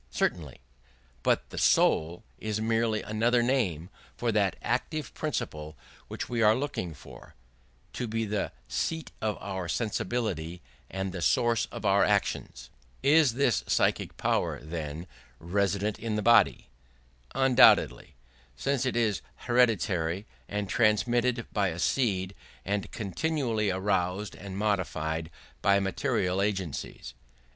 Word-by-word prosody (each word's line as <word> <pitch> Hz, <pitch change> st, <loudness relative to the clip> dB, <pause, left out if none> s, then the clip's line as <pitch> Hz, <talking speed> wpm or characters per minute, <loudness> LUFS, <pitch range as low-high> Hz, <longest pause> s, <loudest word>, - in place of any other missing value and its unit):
Certainly: 75 Hz, -8 st, -2 dB, 0.6 s
but -, -, +1 dB
the -, -, -4 dB
soul 85 Hz, +6 st, +3 dB, 0.2 s
is 110 Hz, -1 st, -2 dB
merely 115 Hz, 0 st, +1 dB
another 120 Hz, +3 st, +2 dB
name 100 Hz, -, 0 dB, 0.3 s
for 120 Hz, -1 st, 0 dB
that 100 Hz, -3 st, +2 dB
active 145 Hz, +5 st, -2 dB
principle 80 Hz, -, -4 dB, 0.3 s
which -, -, -5 dB
we 120 Hz, -2 st, -1 dB
are 110 Hz, 0 st, +6 dB
looking 125 Hz, -, -3 dB
for, -, -, -14 dB, 0.6 s
to 125 Hz, -, -3 dB
be 115 Hz, +1 st, -1 dB
the 105 Hz, -1 st, -2 dB, 0.2 s
seat 160 Hz, -, -2 dB
of 110 Hz, -2 st, -1 dB
our 95 Hz, -3 st, -4 dB
sensibility 105 Hz, -6 st, -2 dB, 0.3 s
and 95 Hz, 0 st, -3 dB
the 90 Hz, -1 st, -5 dB
source 115 Hz, +5 st, +2 dB
of -, -, -8 dB
our 100 Hz, 0 st, +4 dB
actions. 80 Hz, -11 st, -1 dB, 0.3 s
Is 145 Hz, -3 st, +5 dB
this 130 Hz, -4 st, +2 dB
psychic -, -, +1 dB
power, -, -, 0 dB
then, 80 Hz, 0 st, -5 dB, 0.3 s
resident 100 Hz, +3 st, -1 dB
in 110 Hz, -1 st, -2 dB
the 105 Hz, -, -1 dB
body? 120 Hz, 0 st, +4 dB, 0.7 s
Undoubtedly; 130 Hz, -, +5 dB, 0.4 s
since 135 Hz, -, 0 dB
it 125 Hz, -, -1 dB
is 110 Hz, -6 st, +1 dB, 0.2 s
hereditary 100 Hz, -7 st, +2 dB, 0.2 s
and 105 Hz, 0 st, -2 dB
transmitted 120 Hz, +3 st, +2 dB
by 100 Hz, -2 st, +2 dB
a 85 Hz, -2 st, -4 dB
seed, 95 Hz, -2 st, 0 dB, 0.3 s
and 100 Hz, 0 st, -2 dB
continually 115 Hz, -, -1 dB
aroused 95 Hz, +1 st, -1 dB
and 95 Hz, 0 st, -8 dB
modified 85 Hz, -6 st, -1 dB, 0.3 s
by 100 Hz, 0 st, +4 dB
material 95 Hz, -1 st, 0 dB
agencies. 95 Hz, -7 st, -3 dB
105 Hz, 125 wpm, -28 LUFS, 90-120 Hz, 0.7 s, are